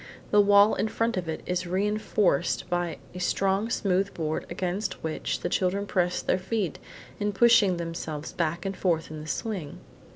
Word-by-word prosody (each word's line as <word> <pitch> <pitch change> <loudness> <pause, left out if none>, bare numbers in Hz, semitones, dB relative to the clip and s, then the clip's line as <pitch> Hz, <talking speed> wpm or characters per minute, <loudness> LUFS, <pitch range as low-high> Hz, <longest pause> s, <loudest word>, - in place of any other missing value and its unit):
The 210 - +7
wall 205 +1 +6
in - - 0
front 230 +1 0
of 180 -3 -3
it 160 - -4
is 180 0 -2
reinforced 195 -4 +1
by 175 -2 -1 0.2
a 180 - -7
strong 195 +4 +1
smooth 195 -2 +1
board 155 -1 -2
against 185 +3 -3
which 160 -1 -2
the - - -1
children 195 +2 0
press 180 -2 0
their - - +1
feet 190 -2 -2 0.4
in 205 0 0
pushing 205 -3 +5
themselves 165 -3 -5
back 170 +1 -1
and 195 0 -2
forth 165 -4 0
in 155 -1 -6
the 155 - -9
swing. 185 -3 -4
185 Hz, 170 wpm, -27 LUFS, 170-205 Hz, 0.4 s, The